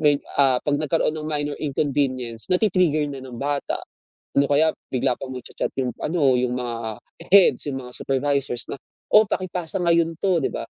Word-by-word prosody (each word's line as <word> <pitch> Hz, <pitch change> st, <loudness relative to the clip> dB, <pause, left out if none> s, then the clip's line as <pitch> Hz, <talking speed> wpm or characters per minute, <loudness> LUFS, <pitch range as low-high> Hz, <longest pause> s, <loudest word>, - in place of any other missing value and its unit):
may, 150 Hz, -2 st, +4 dB, 0.2 s
ah, 130 Hz, -2 st, +5 dB
pag 145 Hz, -1 st, +1 dB
nagkaroon 155 Hz, 0 st, +1 dB
ng 155 Hz, 0 st, -5 dB
minor 145 Hz, -1 st, -1 dB
inconvenience 135 Hz, -5 st, -1 dB
na 180 Hz, -, +5 dB
ti-trigger 180 Hz, -8 st, +2 dB
na 135 Hz, -, -7 dB
ng 125 Hz, -2 st, -9 dB
bata. 145 Hz, +1 st, -1 dB, 0.6 s
Ano 140 Hz, -, +5 dB
kaya 150 Hz, +3 st, +4 dB, 0.2 s
bigla 125 Hz, 0 st, +1 dB
pa -, -, -6 dB
magcha-chat 125 Hz, -2 st, -5 dB
'yung, 125 Hz, -, -1 dB
ano 145 Hz, -6 st, +2 dB
yung 125 Hz, 0 st, 0 dB
mga 115 Hz, -3 st, -4 dB, 0.3 s
heads, 195 Hz, -6 st, +6 dB
yung 135 Hz, -1 st, -4 dB
mga 125 Hz, -, -10 dB
supervisors 135 Hz, -2 st, -1 dB
na -, -, -4 dB, 0.4 s
"Oh 215 Hz, +1 st, +8 dB
paki-pasa 180 Hz, -2 st, -2 dB
ngayon 170 Hz, -1 st, +3 dB
to" 185 Hz, -3 st, +3 dB
'di -, -, -1 dB
ba -, -, -4 dB
145 Hz, 180 wpm, -23 LUFS, 130-160 Hz, 0.6 s, Oh